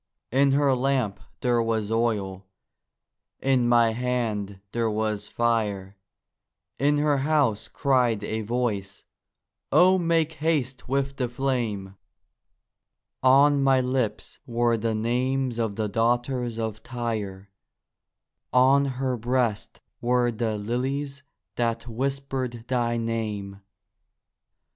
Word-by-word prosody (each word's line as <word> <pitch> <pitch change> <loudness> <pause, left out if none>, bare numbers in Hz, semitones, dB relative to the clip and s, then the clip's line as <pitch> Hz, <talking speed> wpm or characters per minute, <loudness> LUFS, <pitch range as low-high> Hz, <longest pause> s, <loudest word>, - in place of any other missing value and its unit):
In 135 +2 +4
her 140 -1 +3
lamp 130 -5 0 0.2
there 120 -2 +2
was 110 -2 -1
oil, 100 -5 -1 0.9
in 130 -3 +2
my 120 -1 +5
hand 110 -5 -2
there 115 -1 0
was 105 -1 -2
fire; 105 -5 -1 0.8
In 145 +1 +3
her 145 -1 +2
house 140 -7 +1
cried 125 -6 +1
a 110 0 -2
voice, 105 -4 -2 0.7
'O 185 +1 +6
make 165 -2 +1
haste 150 -6 -1
with 135 0 -1
the 125 -3 -1
flame!' 115 -7 -2 1.2
On 140 +2 +5
my 135 -1 +4
lips 125 -4 -2
were 120 -1 +2
the 115 0 -1
names 125 +2 0
of 110 -3 -1
the 110 0 -1
daughters 120 +2 0
of 110 -1 -3
Tyre, 105 -6 -4 1.0
On 135 +2 +5
her 130 -1 -1
breast 120 -2 -1 0.2
were 120 0 +2
the 110 -1 -2
lilies 135 +6 -3 0.4
that 115 -1 -1
whispered 130 -1 -3
thy 120 -2 0
name. 105 -4 -3
120 Hz, 110 wpm, -25 LUFS, 110-135 Hz, 1.2 s, O